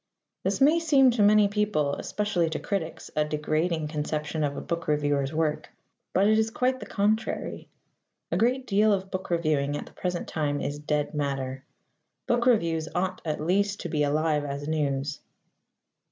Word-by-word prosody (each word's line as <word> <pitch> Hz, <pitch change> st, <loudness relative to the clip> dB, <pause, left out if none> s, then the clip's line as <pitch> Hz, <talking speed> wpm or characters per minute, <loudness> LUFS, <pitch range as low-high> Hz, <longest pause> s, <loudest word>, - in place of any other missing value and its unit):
This -, -, 0 dB
may 300 Hz, +5 st, +5 dB
seem 280 Hz, -6 st, +5 dB
to 235 Hz, -2 st, 0 dB
many 210 Hz, 0 st, +6 dB
people 200 Hz, -9 st, 0 dB
especially 190 Hz, -3 st, -1 dB
to 160 Hz, -, -3 dB
critics 180 Hz, -5 st, -4 dB
a 150 Hz, -, +3 dB
degrading 155 Hz, +1 st, -1 dB
conception 150 Hz, 0 st, -2 dB
of 140 Hz, -1 st, -1 dB
a -, -, -2 dB
book 170 Hz, 0 st, -4 dB
reviewer's 145 Hz, -2 st, +1 dB
work. 155 Hz, -1 st, -1 dB, 0.4 s
But 195 Hz, -, +3 dB
it 215 Hz, +1 st, +4 dB
is 220 Hz, 0 st, +1 dB
quite 255 Hz, +3 st, 0 dB
the -, -, -8 dB
contrary. 215 Hz, +2 st, -1 dB, 0.6 s
A -, -, +1 dB
great 250 Hz, +5 st, +1 dB
deal 210 Hz, 0 st, +3 dB
of 190 Hz, -1 st, -2 dB
book 185 Hz, -1 st, -4 dB
reviewing 155 Hz, -4 st, +1 dB
at -, -, -6 dB
the -, -, -16 dB
present 180 Hz, -1 st, -3 dB
time 145 Hz, -2 st, -1 dB
is 145 Hz, +1 st, -3 dB
dead 150 Hz, 0 st, -1 dB
matter. 135 Hz, -2 st, -2 dB, 0.6 s
Book 240 Hz, 0 st, +1 dB
reviews 165 Hz, -9 st, +2 dB
ought 185 Hz, +1 st, -1 dB
at 155 Hz, -2 st, -2 dB
least 195 Hz, +5 st, +1 dB
to 175 Hz, -, -4 dB
be 155 Hz, -1 st, 0 dB
alive 150 Hz, +1 st, +1 dB
as 140 Hz, 0 st, -5 dB
news. 145 Hz, -2 st, -1 dB
160 Hz, 170 wpm, -27 LUFS, 150-205 Hz, 0.6 s, many